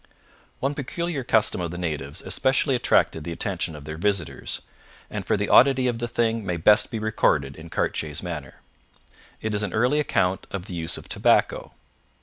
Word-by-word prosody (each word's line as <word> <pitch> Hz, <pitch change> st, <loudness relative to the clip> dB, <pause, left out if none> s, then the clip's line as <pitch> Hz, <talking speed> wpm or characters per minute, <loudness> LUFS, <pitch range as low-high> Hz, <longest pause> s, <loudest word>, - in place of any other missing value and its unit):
One 135 Hz, +2 st, 0 dB
peculiar 150 Hz, +1 st, -3 dB
custom 110 Hz, -5 st, +2 dB
of 85 Hz, -, -2 dB
the 85 Hz, -, -6 dB
natives 75 Hz, -2 st, -3 dB
especially 130 Hz, +8 st, +1 dB
attracted 120 Hz, -9 st, +2 dB
the 85 Hz, -, -5 dB
attention 85 Hz, -1 st, -2 dB
of 75 Hz, -1 st, -10 dB
their 80 Hz, +1 st, -6 dB
visitors, 85 Hz, -8 st, -1 dB, 0.5 s
and -, -, -4 dB
for -, -, +1 dB
the -, -, -1 dB
oddity 130 Hz, 0 st, +5 dB
of 120 Hz, -2 st, -1 dB
the 120 Hz, -, -2 dB
thing 115 Hz, -1 st, 0 dB
may 90 Hz, -3 st, -2 dB
best 105 Hz, +6 st, +5 dB
be 115 Hz, -, -4 dB
recorded 70 Hz, -10 st, +1 dB
in 80 Hz, +1 st, -11 dB
Cartier's 75 Hz, -1 st, -2 dB
manner. 75 Hz, -7 st, -6 dB, 0.8 s
It 110 Hz, -1 st, -2 dB
is 105 Hz, -, +1 dB
an 100 Hz, -4 st, -2 dB
early 125 Hz, +7 st, +2 dB
account 95 Hz, -10 st, 0 dB
of 95 Hz, -2 st, -5 dB
the 95 Hz, -, -8 dB
use 85 Hz, 0 st, -2 dB
of -, -, -11 dB
tobacco. -, -, +1 dB
95 Hz, 180 wpm, -24 LUFS, 80-120 Hz, 0.8 s, oddity